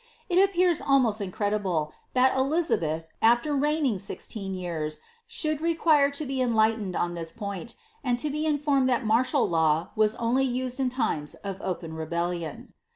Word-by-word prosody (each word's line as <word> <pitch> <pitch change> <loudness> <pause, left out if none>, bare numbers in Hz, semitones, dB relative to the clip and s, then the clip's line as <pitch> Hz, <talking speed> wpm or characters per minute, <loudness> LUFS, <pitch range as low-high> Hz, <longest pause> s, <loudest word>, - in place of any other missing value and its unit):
It 355 0 +3
appears 360 -4 +2
almost 245 -6 +2
incredible 190 -5 -1 0.2
that 255 +1 +4
Elizabeth, 260 - +1 0.2
after 240 +6 +3
reigning 285 -6 +1
sixteen 195 0 -4
years, 160 -4 -3 0.3
should 310 -2 -2
re 335 0 +1
quite 290 -4 +3
lo 305 - -3
be 265 -1 -2
enlightened 220 -5 +1
on 175 0 -1
this 165 -1 -4
point; 200 +2 -6 0.3
and 245 -3 +1
to 295 +4 -2
be 305 +2 -1
informed 285 -3 +2
[hat 245 -1 +1
martial 245 +5 +2
law 160 -1 +1
was 215 0 +2
only 240 +3 +1
used 255 0 -1
in 260 -1 +1
limes 150 - -1
of 195 -1 -7
open 170 -3 -4
rebellion.' 170 0 -4
230 Hz, 160 wpm, -27 LUFS, 180-280 Hz, 0.3 s, that